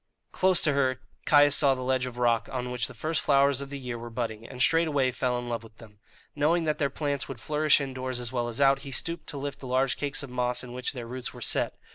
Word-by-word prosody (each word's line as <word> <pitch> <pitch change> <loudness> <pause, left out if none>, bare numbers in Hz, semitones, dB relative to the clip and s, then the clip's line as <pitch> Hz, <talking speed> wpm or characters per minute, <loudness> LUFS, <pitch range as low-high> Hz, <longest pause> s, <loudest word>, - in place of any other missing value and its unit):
Close 185 -2 +3
to 150 - +3
her 130 -2 +1 0.3
Caius 145 -1 +6
saw 140 -2 +4
the 130 - -5
ledge 130 0 0
of 125 -1 -8
rock 115 -3 +2
on 125 -1 -3
which 125 -1 0
the 130 - -11
first 155 +6 -1
flowers 140 -1 +3
of 140 - -6
the 140 - -5
year 125 -3 -5
were 120 0 -7
budding, 115 -2 -4
and 125 - -9
straightway 145 -2 +3
fell 125 0 -1
in 120 0 -5
love 115 -2 -2
with 115 -1 -16
them. 105 -3 -15 0.4
Knowing 160 +4 +2
that 155 -1 -1
their 140 -2 +1
plants 140 0 -2
would 135 -4 -7
flourish 150 +2 +3
indoors 130 -2 -4
as 120 -1 -4
well 120 -2 -1
as 120 +1 -5
out, 135 -1 +5
he 140 - -8
stooped 165 +6 -3
to 145 - -4
lift 140 0 -5
the 130 - -8
large 130 +1 +1
cakes 140 -1 -2
of 135 - -8
moss 125 0 0
in 125 -1 -9
which 125 +2 -3
their 125 -3 -6
roots 125 +1 -5
were - - -9
set. - - 0
130 Hz, 260 wpm, -28 LUFS, 125-140 Hz, 0.4 s, Caius